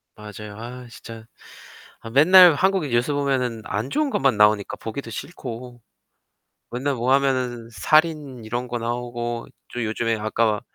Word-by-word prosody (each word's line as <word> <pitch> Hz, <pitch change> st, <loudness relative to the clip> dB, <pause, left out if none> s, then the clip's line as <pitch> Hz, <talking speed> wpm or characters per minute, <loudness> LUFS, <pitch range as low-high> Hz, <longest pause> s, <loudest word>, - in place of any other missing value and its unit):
맞아요. 105 Hz, 0 st, -10 dB
아 125 Hz, +2 st, -8 dB
진짜 115 Hz, -1 st, -11 dB, 0.8 s
아 115 Hz, -, -9 dB
맨날 175 Hz, +6 st, +8 dB
한국 190 Hz, +2 st, +1 dB
뉴스 120 Hz, +2 st, 0 dB
보면은 130 Hz, -5 st, -1 dB
안 110 Hz, +7 st, -3 dB
좋은 300 Hz, -, 0 dB
것만 135 Hz, -, +2 dB
나오니까 105 Hz, -1 st, +3 dB
보기도 115 Hz, +1 st, -7 dB
싫고 125 Hz, -3 st, -8 dB, 0.9 s
맨날 135 Hz, +4 st, -2 dB
뭐 125 Hz, +1 st, 0 dB
하면은 130 Hz, -4 st, 0 dB
살인 150 Hz, -3 st, +1 dB
이런 120 Hz, +3 st, -4 dB
거 120 Hz, 0 st, -3 dB
나오고 120 Hz, 0 st, -4 dB, 0.3 s
또 120 Hz, -1 st, -3 dB
요즘에 115 Hz, +1 st, -1 dB
아까 110 Hz, 0 st, 0 dB
120 Hz, 280 characters per minute, -23 LUFS, 115-140 Hz, 0.9 s, 맨날